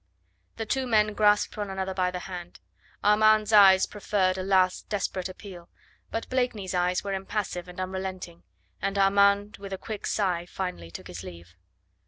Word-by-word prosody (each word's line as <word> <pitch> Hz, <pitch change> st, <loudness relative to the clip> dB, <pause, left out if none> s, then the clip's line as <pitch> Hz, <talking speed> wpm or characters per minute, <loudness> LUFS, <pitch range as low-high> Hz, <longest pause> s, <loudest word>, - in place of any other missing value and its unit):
The 225 Hz, -, -4 dB
two 260 Hz, +4 st, -1 dB
men 215 Hz, -2 st, +3 dB
grasped 210 Hz, 0 st, +3 dB
one 205 Hz, -1 st, -3 dB
another 190 Hz, 0 st, -3 dB
by 185 Hz, -1 st, +1 dB
the 180 Hz, 0 st, -5 dB
hand. 175 Hz, -2 st, -8 dB, 0.4 s
Armand's 215 Hz, +1 st, +4 dB
eyes 195 Hz, -2 st, +7 dB
proffered 195 Hz, -3 st, 0 dB
a 185 Hz, -, -3 dB
last 185 Hz, -1 st, +1 dB
desperate 190 Hz, -2 st, -2 dB
appeal. 185 Hz, -2 st, -11 dB, 0.4 s
But 225 Hz, -, -4 dB
Blakeney's 245 Hz, -7 st, -1 dB
eyes 180 Hz, 0 st, +1 dB
were 200 Hz, -1 st, -3 dB
impassive 190 Hz, -2 st, -3 dB
and 180 Hz, 0 st, -10 dB
unrelenting, 185 Hz, -, -5 dB, 0.4 s
and 195 Hz, +1 st, -1 dB
Armand 200 Hz, +1 st, +3 dB
with 195 Hz, -1 st, -8 dB
a -, -, -3 dB
quick 215 Hz, +2 st, -6 dB
sigh 180 Hz, -4 st, 0 dB
finally 180 Hz, -, -5 dB
took 85 Hz, -, -9 dB
his 85 Hz, -1 st, -8 dB
leave. 85 Hz, -2 st, -11 dB
190 Hz, 165 wpm, -27 LUFS, 180-205 Hz, 0.4 s, eyes